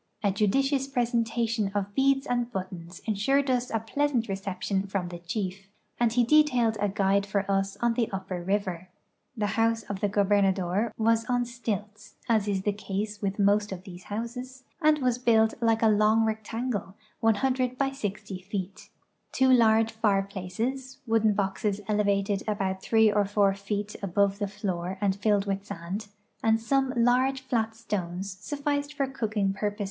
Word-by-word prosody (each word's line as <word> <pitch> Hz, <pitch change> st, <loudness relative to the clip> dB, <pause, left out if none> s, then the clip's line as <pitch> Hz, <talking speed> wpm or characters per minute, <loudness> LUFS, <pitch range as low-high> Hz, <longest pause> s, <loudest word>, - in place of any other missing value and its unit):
A 200 Hz, -, +3 dB
judicious 270 Hz, +7 st, +1 dB
presentation 230 Hz, -4 st, 0 dB
of 200 Hz, -1 st, +1 dB
heads 270 Hz, 0 st, +3 dB
and 245 Hz, -2 st, -1 dB
buttons 185 Hz, -3 st, -6 dB
insured 260 Hz, +6 st, +1 dB
us 250 Hz, 0 st, 0 dB
a 225 Hz, -, 0 dB
pleasant 250 Hz, +1 st, 0 dB
reception 195 Hz, 0 st, -2 dB
from 190 Hz, -2 st, -2 dB
the 175 Hz, -1 st, -7 dB
chief, 190 Hz, +2 st, -4 dB, 0.3 s
and 240 Hz, -1 st, +3 dB
he 240 Hz, +1 st, +3 dB
detailed 250 Hz, -4 st, +4 dB
a 205 Hz, -, +2 dB
guide 200 Hz, 0 st, +2 dB
for 200 Hz, 0 st, -1 dB
us 195 Hz, 0 st, 0 dB
on 235 Hz, -1 st, +3 dB
the 230 Hz, -1 st, 0 dB
upper 190 Hz, -2 st, -4 dB
river. 185 Hz, -1 st, -2 dB, 0.5 s
The 210 Hz, -, 0 dB, 0.2 s
house 225 Hz, 0 st, +2 dB
of 200 Hz, -1 st, -5 dB
the 205 Hz, -, +1 dB
gobernador 200 Hz, 0 st, +2 dB
was 225 Hz, +1 st, +2 dB
on 245 Hz, -1 st, +1 dB
stilts 215 Hz, -3 st, -5 dB
(as 220 Hz, -3 st, +2 dB
is 195 Hz, -2 st, -1 dB
the 205 Hz, -, +1 dB
case 205 Hz, +1 st, -4 dB
with 200 Hz, -1 st, -2 dB
most 205 Hz, 0 st, +3 dB
of 185 Hz, -1 st, -6 dB
these 180 Hz, -2 st, -11 dB
houses) 250 Hz, +4 st, -6 dB, 0.2 s
and 305 Hz, -1 st, +5 dB
was 250 Hz, -3 st, 0 dB
built 225 Hz, -2 st, +4 dB
like 225 Hz, -1 st, +2 dB
a -, -, +6 dB
long 215 Hz, +1 st, +4 dB
rectangle, 220 Hz, -1 st, -3 dB, 0.2 s
100 255 Hz, +3 st, +1 dB
by 275 Hz, 0 st, +1 dB
GO 210 Hz, -8 st, -3 dB, 0.2 s
feet. 190 Hz, 0 st, -6 dB, 0.4 s
Two 260 Hz, 0 st, +4 dB
large 225 Hz, -2 st, +4 dB
fireplaces 215 Hz, +5 st, -2 dB
(wooden 220 Hz, -2 st, +3 dB
Ijoxes 200 Hz, +1 st, -1 dB
elevated 200 Hz, -1 st, +1 dB
about 195 Hz, -3 st, -1 dB
three 220 Hz, 0 st, +4 dB
or 205 Hz, 0 st, +2 dB
four 200 Hz, 0 st, +2 dB
feet 205 Hz, +1 st, -4 dB
above 200 Hz, +1 st, +1 dB
the 205 Hz, -2 st, -2 dB
lloor 185 Hz, -1 st, -2 dB
and 195 Hz, -2 st, +1 dB
filled 205 Hz, 0 st, +1 dB
witli 195 Hz, -1 st, -2 dB
sand) 185 Hz, +4 st, -5 dB, 0.3 s
and 225 Hz, 0 st, +3 dB
some 270 Hz, +3 st, +1 dB
large 255 Hz, +3 st, +3 dB
fiat 225 Hz, -4 st, -1 dB
stones 195 Hz, -4 st, -4 dB
sufiiced 285 Hz, +5 st, -2 dB
for 275 Hz, -, +1 dB
cooking 215 Hz, -7 st, -1 dB
pur|>o. 205 Hz, +1 st, -2 dB
210 Hz, 165 wpm, -27 LUFS, 195-235 Hz, 0.5 s, a